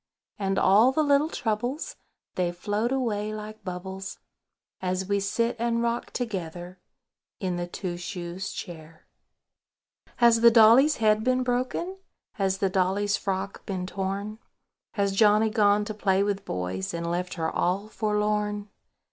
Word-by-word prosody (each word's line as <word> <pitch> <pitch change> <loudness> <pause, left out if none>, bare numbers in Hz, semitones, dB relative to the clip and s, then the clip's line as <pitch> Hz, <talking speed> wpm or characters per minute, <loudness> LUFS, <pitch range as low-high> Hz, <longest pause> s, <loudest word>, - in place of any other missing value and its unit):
And 195 -1 0
all 215 +7 +5
the 310 +3 +1
little 285 +1 +3
troubles, 245 +4 -2 0.4
They 180 -1 0
float 205 +6 -2
away 215 -6 -1
like 215 0 -8
bubbles, 190 +1 -6 0.6
As 185 0 -1
we 200 0 +1
sit 230 +4 0
and 235 0 0
rock 235 0 -1
together 180 -5 -5 0.6
In 185 -2 -2
the 175 0 -3
Two 175 0 -5
shoes 180 +2 -5
Chair. 160 -2 -9 1.1
Has 235 -2 +5
the 235 - +9
dolly's 235 +6 +6
head 215 -1 +3
been 255 +1 +2
broken? 255 +9 -2 0.4
Has 195 -3 0
the 195 - +1
dolly's 195 +2 +1
frock 195 0 -3
been 185 -2 -3
torn? 195 +3 -4 0.5
Has 200 -2 +1
Johnny 215 +1 +4
gone 210 -1 +3
to 215 - -4
play 195 -2 +2
with 200 -1 -2
boys, 95 - -3
And 170 0 -3
left 175 +2 -2
her 160 -2 -2
all 190 +4 0
forlorn? 210 -1 -1
205 Hz, 140 wpm, -26 LUFS, 185-225 Hz, 1.1 s, the